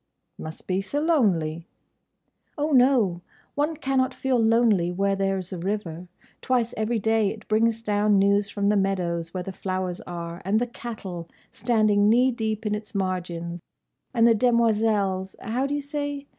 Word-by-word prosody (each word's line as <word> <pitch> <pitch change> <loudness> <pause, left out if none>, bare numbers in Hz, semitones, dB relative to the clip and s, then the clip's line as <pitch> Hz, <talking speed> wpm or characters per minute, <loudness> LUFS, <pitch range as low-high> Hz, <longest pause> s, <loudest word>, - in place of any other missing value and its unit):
"Must 155 0 -8
be 185 +1 0
so 240 +9 -3
lonely." 180 - +1 0.9
"Oh, 300 +1 -1
no! 245 -9 +4 0.3
One 300 +2 -1
cannot 265 -3 0
feel 260 -2 0
lonely 225 -6 +3
where 195 +2 0
there 195 0 0
's 185 0 -7
a 180 - -5
river. 180 -2 -4 0.3
Twice 245 -3 0
every 220 +2 0
day 220 -1 +2
it 215 +1 -9
brings 225 +1 +1
down 210 -1 +2
news 200 +1 +3
from 200 -1 0
the 210 - +3
meadows, 175 -4 -1
where 185 -1 -4
the 195 - -6
flowers 185 -1 -3
are, 170 -1 -6
and 200 +4 +2
the 245 - 0
cattle, 205 -8 -7 0.2
standing 215 -3 +2
knee 250 +3 +4
deep 220 -2 -3
in 210 - 0
its 210 0 -6
margin, 175 -3 -3 0.5
and 235 -2 +4
the 230 - +6
demoiselles—how 220 0 +1
do 285 - -2
you 290 - -2
say? 285 0 -4
210 Hz, 160 wpm, -25 LUFS, 185-235 Hz, 0.9 s, the